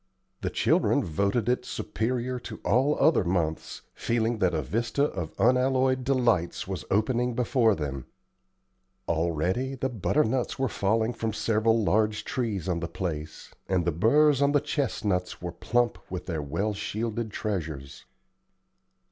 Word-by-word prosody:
The - - -1
children - - +2
voted 100 +8 0
it 125 0 +1
superior 125 +1 -2
to - - -8
all 135 +5 +3
other 160 -10 +4
months, 85 -3 -2
feeling 115 -1 0
that 90 -4 +2
a 80 - -1
vista 115 - 0
of 90 - -3
unalloyed 130 +1 +3
delights 125 -10 +1
was - - -4
opening 120 +4 +1
before 115 -3 +3
them. 70 -5 -5 1.0
Already 85 - 0
the 135 +1 -2
butternuts 125 +2 0
were 135 0 +1
falling 110 +3 0
from 115 -2 -3
several 110 +1 +2
large 105 +1 +1
trees 105 -8 -2
on 90 -2 0
the 85 - -3
place, 85 -3 -5 0.2
and 90 -3 +1
the 85 - +2
burrs 140 - +4
on 140 0 +3
the 145 - +5
chestnuts 105 -11 -1
were 90 -1 -5
plump 120 +2 0
with 90 -1 -5
their 80 -4 -3
well 85 +9 -2
shielded 110 +2 -3
treasures. 80 -11 -4
110 Hz, 140 wpm, -27 LUFS, 90-125 Hz, 1.0 s, the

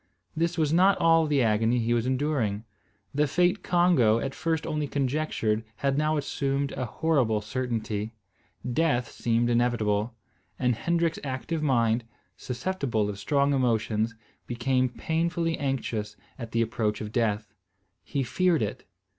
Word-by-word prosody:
This 170 +2 0
was 155 -1 +1
not 190 +3 +5
all 165 -1 +4
the 145 -4 +2
agony 110 +2 +2
he 120 0 +1
was 120 +1 0
enduring. 130 -6 0 0.5
The 145 +1 +2
fate 180 +7 +2
Congo 175 -11 +3
at 135 +3 -3
first 160 0 -1
only 150 -2 -2
conjectured 135 -6 -1
had 135 +4 0
now 155 +1 +1
assumed 140 -1 -1
a 130 - -3
horrible 130 -5 +1
certainty. 110 -2 -3 0.6
Death 135 -5 +1
seemed 120 0 0
inevitable; 115 -2 +1 0.4
and 125 -1 +2
Hendrik's 170 +6 0
active 140 +4 -3
mind, 120 -5 +2 0.3
susceptible 125 - -2
of 100 -1 -6
strong 140 +6 +2
emotions, 115 -3 0 0.3
became 130 +1 +1
painfully 165 +4 -1
anxious 115 -7 -2 0.2
at 115 -2 -6
the 115 0 +2
approach 110 -2 -1
of 105 -1 -6
death. 105 -3 -1 0.5
He 140 - -2
feared 180 +4 +2
it. - - -5
130 Hz, 140 wpm, -27 LUFS, 115-155 Hz, 0.6 s, not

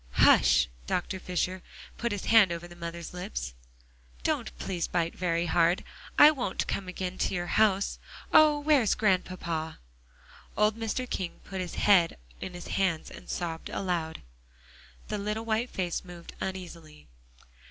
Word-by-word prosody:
"Hush!" - - +6 0.2
Dr. 190 +1 -1
Fisher 180 +1 -2 0.4
put 235 0 -1
his 205 -1 -3
hand 220 -5 +6
over 170 0 -4
the 175 - -13
mother's 170 0 -7
lips. 65 - -5 0.7
"Don't 70 - -1
please 170 - -2
bite 170 -1 0
me - - -19
very 170 -1 +1
hard. 170 +1 +2 0.3
I 295 +1 +10
won't 250 -10 -2
come 195 - -3
up - - -7
again 185 0 -4
to - - 0
your 175 0 -2
house. 200 +1 +2 0.3
Oh! 305 -1 +7
where's 290 -7 +3
Grandpapa?" 185 -5 -1 0.8
Old 210 0 +3
Mr. 230 +3 -2
King 180 -7 -4
put 190 -1 -5
his 180 -2 -5
head 180 -5 +4 0.2
on 185 - -5
his 175 - -8
hands, 185 -5 0
and - - -12
sobbed 165 -2 -4
aloud. 170 - -2 0.9
The 210 - -2
little 210 +2 -3
white 225 +2 0
face 180 -2 -2
moved 175 -2 -11
uneasily. 170 -5 -7
180 Hz, 155 wpm, -29 LUFS, 170-205 Hz, 0.9 s, I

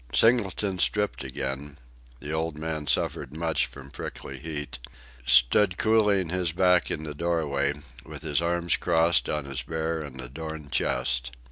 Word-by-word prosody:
Singleton 100 -5 +3
stripped 105 +3 +1
again 70 +2 -4 0.4
the 75 - -5
old 80 -1 -2
man 80 -1 -3
suffered 65 - 0
much 80 +1 0
from 70 0 -12
prickly - - -7
heat 75 -5 -5 0.5
stood 65 +11 +5
cooling 105 -5 +3
his 90 -1 0
back 90 +1 +3
in 75 - -3
the 75 -1 -5
doorway, 75 -3 0 0.3
with - - -8
his 75 +2 +1
arms 85 0 +1
crossed 80 0 +3
on 75 -2 -1
his 70 -2 -2
bare 80 +4 -2
and 70 -4 -8
adorned 75 +3 -7
chest. 60 -2 +1
80 Hz, 145 wpm, -27 LUFS, 70-85 Hz, 0.5 s, stood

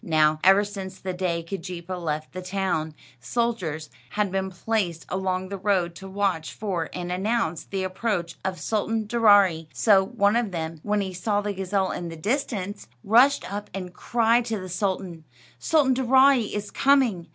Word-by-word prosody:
Now, 155 -1 +3
ever 195 +2 +6
since 190 -2 -7
the 185 -1 -4
day 175 -2 -1
Keejeepaa 180 -1 -6
left 155 -1 -3
the 185 - -5
town, 180 -4 -2 0.2
soldiers 170 - -2 0.2
had 205 -2 -1
been 190 0 -1
placed 180 -2 -2
along 185 0 -2
the 200 -1 -5
road 185 -4 +1
to 195 0 -9
watch 190 -5 -1
for 185 -6 -3
and 180 0 -5
announce 185 -3 -1
the 195 -1 -3
approach 185 -3 -2
of 190 -1 -3
Sultan 220 0 -1
Daaraaee; 205 -7 +4
so 200 -4 +4
one 205 0 +1
of 235 -3 +1
them, 165 -2 -4
when 210 +2 0
he 190 -1 -4
saw 205 +3 0
the 205 0 -3
gazelle 190 0 -1
in 175 -1 -4
the 165 - -7
distance, 205 - -2 0.2
rushed 245 +7 +4
up 205 +1 -5
and 180 -2 -6
cried 235 +3 +2
to 225 -2 -2
the 185 0 -7
sultan, 185 -3 -2 0.4
"Sultan 285 - +3
Daaraaee 260 -2 +4
is 205 0 -4
coming! 260 -11 +2
190 Hz, 170 wpm, -25 LUFS, 175-215 Hz, 0.4 s, ever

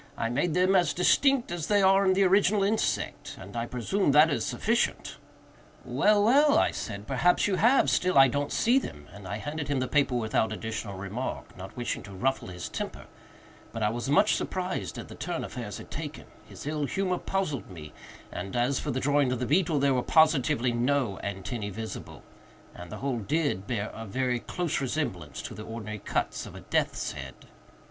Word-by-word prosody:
I 115 - -1
made 145 +7 0
them 185 +2 +3
as 175 -6 +3
distinct 265 +6 +3
as 170 -3 -3
they 205 -1 +3
are 195 +1 +5
in 190 -1 +4
the 195 +1 +3
original 195 +1 +4
insect, 215 +3 -1
and 95 +3 -10
I 115 0 -2
presume 140 - 0
that 150 +2 +6
is 140 - 0
sufficient." 230 +2 -1 0.7
"Well, 210 0 +3
well," 285 +6 +5
I - - +3
said, 100 +1 -6
"perhaps 140 +9 +2
you 195 -2 0
have—still 220 - +3
I 135 0 +9
don't 145 +3 -2
see 245 +4 +3
them;" 75 - -8
and 100 -1 -10
I 100 - -3
handed 145 +5 -4
him 145 -2 0
the 130 - -1
paper 140 -3 +2
without 110 -1 0
additional 110 -2 -5
remark, 100 +7 -5
not 95 +6 -10
wishing 120 0 -2
to 100 -2 -11
ruffle 135 +7 -1
his 90 -1 -6
temper; - - -6 0.7
but 115 -1 -4
I 105 - +3
was 120 +3 -4
much 200 +9 +4
surprised 185 0 -3
at - - -7
the - - -10
turn - - -4
affairs - - -6
had - - -11
taken; - - -6 0.2
his - - -10
ill 150 0 -1
humor 185 +3 -1
puzzled 185 -9 -2
me—and, 85 +4 -9
as 125 +3 +1
for - - -4
the 130 -1 -1
drawing 145 -1 +2
of 130 - 0
the 125 - -2
beetle, 160 +2 +2
there 140 -1 +3
were 125 - +1
positively 130 -5 +3
no 120 -3 0
antennæ 100 +2 -4
visible, 110 +3 -7 0.5
and 90 -1 -10
the - - -6
whole 130 -3 -2
did 140 - -1
bear 110 -4 -2
a 115 0 -7
very 125 +3 0
close 175 +2 -2
resemblance 130 - -3
to - - -6
the - - -8
ordinary 110 -1 -6
cuts - - -2
of - - -11
a - - -9
death's - - -1
head. - - -8
135 Hz, 195 wpm, -28 LUFS, 110-180 Hz, 0.7 s, I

